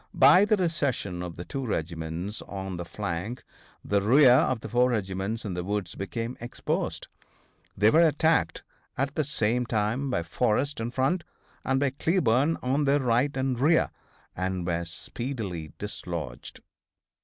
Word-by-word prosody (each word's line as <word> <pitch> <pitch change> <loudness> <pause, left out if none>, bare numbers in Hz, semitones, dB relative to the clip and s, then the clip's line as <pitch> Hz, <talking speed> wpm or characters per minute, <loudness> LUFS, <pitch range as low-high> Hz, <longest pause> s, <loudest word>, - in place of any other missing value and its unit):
By 190 +3 +7
the 215 0 +3
recession 140 - -1
of 90 -2 -6
the 85 - -7
two 135 - -4
regiments 85 -1 -3
on 95 -2 -5
the 85 - -5
flank 100 +5 -4 0.4
the 100 0 +2
rear 130 +6 +6
of 125 -2 +3
the - - -6
four 125 +1 +3
regiments 100 0 -2
in 100 - -3
the 90 0 -3
woods 100 +1 -2
became 115 +5 -4
exposed. 120 +1 -3 0.7
They 105 +2 +5
were 165 +1 +6
attacked 160 +2 +1 0.3
at 140 +2 -1
the 155 - 0
same 125 -4 0
time 115 +5 0
by 85 -10 0
Forrest 120 - 0
in 115 +1 -2
front, 135 +8 0 0.4
and 135 0 +1
by 140 -1 +1
Cleburne 145 -1 +2
on 135 +4 +1
their 140 +1 +3
right 130 +2 +1
and 130 -2 0
rear, 160 +5 +3 0.4
and 95 -1 -2
were 85 -1 -1
speedily 95 - -5
dislodged. 85 -10 -6
115 Hz, 155 wpm, -27 LUFS, 95-135 Hz, 0.7 s, By